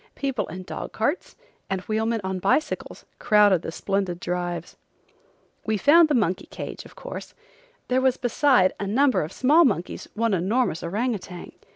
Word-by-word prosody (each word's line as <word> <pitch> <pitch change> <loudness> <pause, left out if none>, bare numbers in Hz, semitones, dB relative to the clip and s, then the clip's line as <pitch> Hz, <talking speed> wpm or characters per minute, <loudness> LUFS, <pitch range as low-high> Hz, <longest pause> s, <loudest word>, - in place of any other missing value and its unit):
People 270 -5 -2
in 185 +3 -7
dog - - -7
carts 285 +11 -2 0.3
and 190 -1 -2
wheelmen 220 +2 -1
on 190 0 -3
bicycles 200 +12 -1
crowded 210 -6 +4
the - - -5
splendid 195 -1 -2
drives. 175 -1 -4 0.9
We 220 -1 0
found 315 - +6
the 295 - +2
monkey 190 -6 0
cage, - - -7
of - - -15
course. - - -8 0.5
There 255 +1 +2
was 260 -1 +2
besides 245 -5 +3
a 200 - -3
number 260 +6 +3
of 155 - -5
small 300 +6 +4
monkeys 195 - -1
one 225 -1 +1
enormous 190 +1 0
orang 220 +9 -1
outang. 180 -3 -8
210 Hz, 160 wpm, -24 LUFS, 185-255 Hz, 0.9 s, found